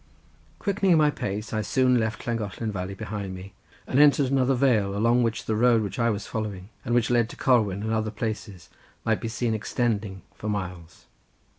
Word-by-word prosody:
Quickening 195 -4 +2
my 150 -1 +4
pace 105 -3 -4
I 110 - 0
soon 125 +3 +2
left 110 -1 -2
Llangollen 110 -1 -3
valley 95 0 -4
behind 100 -1 -5
me 95 +1 -10 0.3
and 130 - +1
entered 145 -2 +5
another 135 -1 +3
vale, 110 -7 +2
along 115 +3 +3
which 115 -2 -1
the 110 - 0
road 115 0 +4
which 100 +1 -5
I 115 0 +3
was 105 -2 -2
following, 105 -3 -5
and 120 - 0
which 120 0 +2
led 120 -2 +3
to - - -9
Corwen 105 -7 +2
and 110 +1 -1
other 110 -1 0
places, 105 -4 -5 0.4
might 110 -2 +1
be - - -3
seen 115 0 -1
extending 105 -4 -2
for 105 - -5
miles. 90 -5 -5
110 Hz, 185 wpm, -26 LUFS, 100-120 Hz, 0.4 s, entered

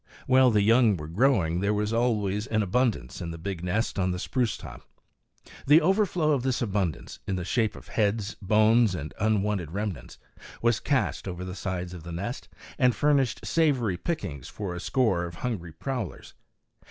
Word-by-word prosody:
While 130 0 +5
the 105 -3 +3
young 115 -2 +4
were 75 -1 -7
growing 90 - +2
there 100 +2 +1
was 105 +1 -1
always 105 -3 0
an 110 -1 +1
abundance 105 - 0
in 85 - -4
the 85 - -6
big 85 +1 -5
nest 100 +3 -1
on 95 -1 +1
the 90 - -2
spruce 115 +4 -1
top. - - -10 0.9
The 150 +3 +8
overflow 180 -3 +2
of 140 -4 +2
this 130 -1 0
abundance, 95 - -2
in 95 - -1
the 90 -1 -3
shape 110 +1 0
of - - -13
heads, 105 0 0
bones 110 +1 +4
and 75 -3 -6
unwanted 105 -5 0
remnants, 95 - -5 0.4
was 115 -1 +2
cast 135 -7 -1
over 90 0 -5
the 90 - -6
sides 90 -2 -4
of 90 - -8
the 85 +2 -8
nest 100 +10 -5 0.3
and 125 -3 +4
furnished 140 -4 +1
savory 135 - +2
pickings 85 - -4
for 100 -4 -5
a 90 - -5
score 100 -5 +1
of 85 -1 -8
hungry 95 -7 -4
prowlers. 110 - -5
105 Hz, 175 wpm, -27 LUFS, 90-125 Hz, 0.9 s, The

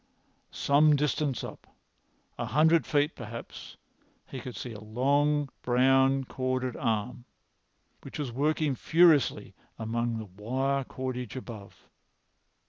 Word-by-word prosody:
Some 150 +1 +4
distance 145 -2 0
up—a - - -11
hundred 160 +3 +3
feet, 145 +1 +2
perhaps—he 115 +3 -11
could 125 0 -8
see 120 - -6
a 105 - -8
long 140 +7 +1
brown 135 +2 +3
corded 130 -1 -2
arm, 115 +3 -2 0.8
which - - -9
was 145 -5 -3
working 150 +3 +1
furiously 160 0 +3 0.2
among 115 +1 -2
the 110 - -5
wire 130 +8 -2
cordage 130 -1 -5
above. 115 -6 -10
130 Hz, 105 wpm, -29 LUFS, 120-145 Hz, 0.8 s, Some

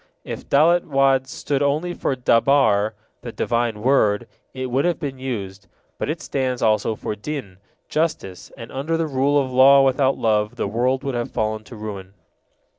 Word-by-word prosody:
If - - -8
Dalet 170 +5 +4
had 135 -1 +3
stood 140 +1 -3
only 150 +5 0
for 135 - -2
Dabar, 115 -4 +3 0.3
the 120 - -7
Divine 115 -2 -1
Word, 120 -4 +2 0.2
it 130 -1 -5
would 135 +3 +1
have 175 -1 0
been 135 -4 -5
used, 100 -7 -5 0.3
but - - -2
it 165 +2 -3
stands 130 -2 -2
also 110 0 +2
for 105 - -5
Din, 105 -4 -6 0.3
justice, 155 - -3
and 115 - -9
under 155 +5 -2
the 165 - 0
rule 140 0 +1
of 130 -2 -2
law 135 +2 +7
without 135 0 +2
love 105 -1 0
the - - -2
world 125 +5 0
would 135 -2 -3
have 120 -1 -2
fallen 110 0 -2
to 120 - -11
ruin. 100 -3 -8
130 Hz, 175 wpm, -22 LUFS, 110-140 Hz, 0.3 s, law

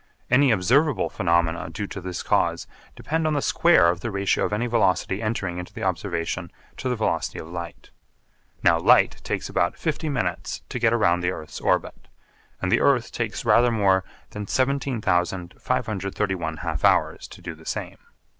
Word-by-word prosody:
Any 135 +2 +5
observable 125 - +2
phenomena 85 -2 +1
due 95 +6 -4
to 95 - -7
this 90 -1 -5
cause - - +1 0.3
depend 160 +1 -1
on 155 - +1
the - - +2
square 170 - +4
of 85 0 -1
the 120 - -4
ratio 100 -1 +1
of - - -3
any 110 +4 0
velocity 100 -4 +1
entering 100 -5 -2
into 90 - -8
the - - -6
observation 90 -2 -2 0.3
to 130 - -3
the 125 - 0
velocity 110 - -1
of - - -7
light. 85 -1 -8 0.7
Now - - +5
light - - +4
takes - - -3
about 85 - 0
fifty 160 -1 -2
minutes 95 - -3
to 125 - -4
get 115 -1 +3
round 90 -7 +2
the 90 - +1
earth's 80 -4 -7
orbit; - - -1 0.5
and 90 - -1
the 115 - +3
earth 130 -4 +2
takes 115 -3 -3
rather 120 +1 +5
more 100 -4 +2 0.3
than 105 -1 -6
17,531 100 - -1
half 80 -2 -4
hours - - +2
to - - -13
do 85 - -7
the 80 0 -16
same. - - -4
100 Hz, 170 wpm, -24 LUFS, 90-120 Hz, 0.7 s, Any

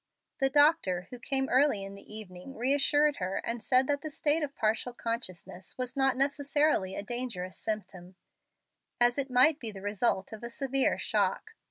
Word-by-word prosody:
The 270 0 +3
doctor, 290 - +3
who 250 - -7
came 265 +2 +1
early 260 -6 +3
in 195 0 -8
the 200 - -11
evening, 210 +4 -7
reassured 285 +4 +3
her, 185 0 -3
and 230 0 -3
said 255 +4 +3
that 285 +1 -1
the 310 - -5
state 300 +1 +1
of 285 -2 -4
partial 220 +3 -1
consciousness 190 -5 -5
was 255 +1 -3
not 270 -1 +2
necessarily 285 -7 +1
a - - -4
dangerous 210 -6 -4
symptom, 190 -4 -5 0.8
as 240 +2 +3
it 275 -1 -1
might 260 +5 +4
be 230 - -4
the 195 - -10
result 205 0 -1
of 220 - -9
a 235 - -6
severe 270 +1 0
shock. 445 - -1
250 Hz, 175 wpm, -29 LUFS, 205-280 Hz, 0.8 s, might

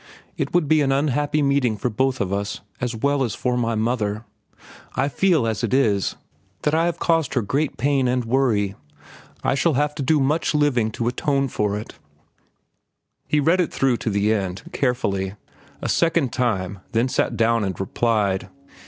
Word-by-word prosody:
"It - - -2
would 175 -4 +2
be 155 0 +4
an 135 -1 +2
unhappy 145 +2 +1
meeting 140 -6 +2
for 120 +4 -2
both 130 +3 0
of 100 -1 -1
us, 100 0 -3 0.2
as 120 -1 -2
well 140 +4 +1
as 115 - -2
for 125 -1 -1
my 115 -2 0
mother. 110 -1 -1 0.7
I 135 - +1
feel, 155 0 +2
as 110 -2 -2
it - - +1
is, 105 -8 +2 0.5
that 150 - +1
I 165 +1 +3
have 175 - -2
caused 165 -5 +1
her 125 - +2
great 140 +8 -1
pain 135 +1 +2
and 125 -1 0
worry. 115 -6 +1 0.7
I - - +2
shall 150 +2 +2
have 145 +2 +1
to 150 - -5
do 150 +3 +2
much 150 +3 +1
living 135 -7 +2
to 115 - -2
atone 135 +2 0
for 105 -2 -1
it." 105 - -9 1.3
He 150 - +2
read 165 +6 +3
it 170 - -1
through 130 -3 +1
to 115 - -3
the 100 +1 +2
end, 95 -3 -3
carefully, 100 -7 -1 0.5
a - - -1
second 165 -6 +1
time, 100 -6 -1
then 115 +3 +2
sat - - 0
down 115 -1 +2
and 95 -4 -3
replied. 100 -1 0
125 Hz, 180 wpm, -22 LUFS, 110-145 Hz, 1.3 s, be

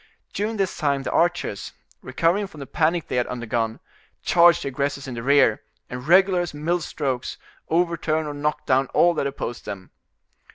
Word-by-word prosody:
During 215 +2 -2
this 195 -2 -1
time 140 -3 0
the - - -3
archers, 175 - 0 0.3
recovering 185 +5 0
from 155 -6 -14
the 140 - -6
panic 165 +3 0
they - - -2
had 125 - +1
undergone, 115 -2 -2 0.4
charge 170 0 +5
the - - -3
aggressors 140 +1 -3
in 130 - -5
the 120 - -5
rear, 140 +3 +4 0.3
and 125 +2 -6
regular 185 +1 +5
as 175 -4 -5
mill 170 +4 -1
strokes, 135 -5 -3 0.3
overturn 165 -2 +1
or 150 - -4
knock 150 +1 -2
down 130 0 +2
all 175 0 +5
that 140 - -1
opposed 120 -3 -5
them. 95 -2 -7
150 Hz, 175 wpm, -23 LUFS, 130-175 Hz, 0.4 s, charge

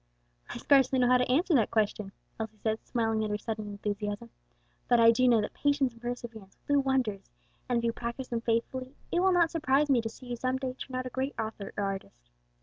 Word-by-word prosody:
"I - - -5
scarcely 270 -2 +4
know 250 - +4
how 250 0 +5
to 250 0 +1
answer 330 +6 +2
that 235 -7 +4
question," 210 -2 0 0.3
Elsie 220 -1 -5
said, 220 +1 -2
smiling 225 -2 0
at 215 - -2
her 210 - -1
sudden 215 0 -5
enthusiasm, 205 +2 -4 0.6
"but 240 -1 +4
I 230 0 +8
do 255 +2 +3
know 235 -3 +5
that 210 - -4
patience 280 -3 +1
and 230 - -18
perseverance 235 -5 -7
will 285 - +3
do - - +5
wonders, 260 -7 0 0.4
and 245 - +2
if 235 - -1
you 230 0 +1
practice 235 +3 -5
them 235 -1 -2
faithfully, 255 +3 -2 0.2
it 345 - +2
will 380 +1 +4
not 340 -2 +3
surprise 295 -3 +2
me 250 -3 +4
to 225 - -4
see 255 - -13
you 245 -1 -4
some 255 +2 0
day 260 -1 -3
turn 255 0 -8
out 255 0 -2
a 255 - -5
great 265 +3 -2
author 220 -2 -4
or 205 - 0
artist. - - -6
235 Hz, 235 wpm, -29 LUFS, 220-260 Hz, 0.6 s, I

